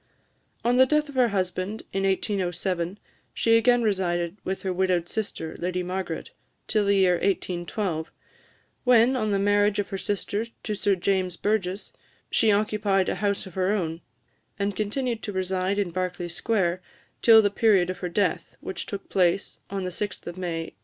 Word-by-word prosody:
On 245 Hz, +1 st, +3 dB
the 260 Hz, 0 st, +7 dB
death 300 Hz, +1 st, +1 dB
of -, -, -8 dB
her 255 Hz, -2 st, +4 dB
husband 190 Hz, 0 st, -2 dB
in 195 Hz, 0 st, 0 dB
1807, 185 Hz, -2 st, -1 dB, 0.4 s
she 225 Hz, 0 st, +4 dB
again 240 Hz, +1 st, +4 dB
resided 175 Hz, -4 st, 0 dB
with 190 Hz, +1 st, -3 dB
her 190 Hz, -1 st, -1 dB
widowed 180 Hz, -2 st, +1 dB
sister, 185 Hz, -7 st, -4 dB
the -, -, -13 dB
Lady 180 Hz, +1 st, -1 dB
Margaret, 180 Hz, -2 st, -4 dB, 0.4 s
till 215 Hz, -1 st, +2 dB
the 200 Hz, 0 st, +3 dB
year 185 Hz, -2 st, +4 dB
1812, 175 Hz, -2 st, -2 dB, 0.7 s
when, 250 Hz, 0 st, +5 dB
on 215 Hz, -4 st, 0 dB
the 200 Hz, -, +2 dB
marriage 205 Hz, +1 st, +3 dB
of 205 Hz, -, -1 dB
her 195 Hz, -, -3 dB
sister 205 Hz, +2 st, -2 dB, 0.2 s
to 215 Hz, -, -2 dB
Sir 200 Hz, -1 st, +2 dB
James 185 Hz, -1 st, 0 dB
Burges, 200 Hz, -2 st, -1 dB, 0.4 s
she 220 Hz, -, +4 dB
occupied 205 Hz, -2 st, +1 dB
a -, -, -1 dB
house 200 Hz, 0 st, 0 dB
of 190 Hz, -, -11 dB
her 190 Hz, +2 st, +1 dB
own, 165 Hz, -5 st, -2 dB, 0.6 s
and 200 Hz, -1 st, -1 dB
continued 225 Hz, +3 st, -1 dB
to 205 Hz, -, -4 dB
reside 190 Hz, +1 st, -1 dB
in 200 Hz, -4 st, 0 dB
Berkeley 180 Hz, -1 st, -3 dB
Square 180 Hz, -1 st, 0 dB, 0.4 s
till 225 Hz, -2 st, +8 dB
the 205 Hz, -, +2 dB
period 200 Hz, -5 st, +3 dB
of 185 Hz, -, -8 dB
her 180 Hz, -, -3 dB
death, 180 Hz, 0 st, -1 dB
which 190 Hz, -, -5 dB
took 200 Hz, -1 st, -6 dB
place 185 Hz, 0 st, +1 dB
on 195 Hz, -1 st, -3 dB
the 180 Hz, -, -3 dB
6th 205 Hz, +3 st, -4 dB
of 175 Hz, -, -6 dB
May 170 Hz, -3 st, -4 dB
1825. -, -, -42 dB
195 Hz, 180 wpm, -26 LUFS, 180-210 Hz, 0.7 s, till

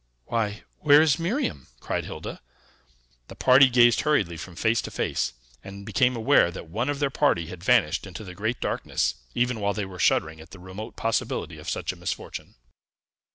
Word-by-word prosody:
"Why, 105 Hz, -3 st, -2 dB, 0.2 s
where 145 Hz, -1 st, +6 dB
is 155 Hz, 0 st, +3 dB
Miriam?" 170 Hz, -, -2 dB
cried -, -, -3 dB
Hilda. -, -, -7 dB, 0.9 s
The -, -, -11 dB
party 130 Hz, +1 st, +6 dB
gazed 120 Hz, -2 st, +5 dB
hurriedly 105 Hz, -, +1 dB
from 85 Hz, +2 st, -9 dB
face 110 Hz, +5 st, +1 dB
to -, -, -6 dB
face, -, -, -2 dB, 0.3 s
and 100 Hz, 0 st, -9 dB
became 125 Hz, +2 st, +2 dB
aware 115 Hz, -3 st, +4 dB
that 85 Hz, -, -8 dB
one 115 Hz, -, -2 dB
of 145 Hz, -, -1 dB
their 140 Hz, -1 st, 0 dB
party 135 Hz, -, +2 dB
had 90 Hz, +1 st, -10 dB
vanished 100 Hz, -7 st, +2 dB
into 95 Hz, +3 st, -8 dB
the 90 Hz, -3 st, -9 dB
great 110 Hz, +6 st, -2 dB
darkness, -, -, -1 dB, 0.2 s
even 125 Hz, -1 st, 0 dB
while 100 Hz, -1 st, 0 dB
they 105 Hz, -1 st, -2 dB
were 95 Hz, -1 st, -10 dB
shuddering 80 Hz, 0 st, +1 dB
at 80 Hz, -, -14 dB
the 95 Hz, -, -12 dB
remote 95 Hz, +5 st, -8 dB
possibility 115 Hz, 0 st, -2 dB
of -, -, -6 dB
such -, -, -2 dB
a -, -, -13 dB
misfortune. -, -, -6 dB
110 Hz, 185 wpm, -25 LUFS, 95-125 Hz, 0.9 s, where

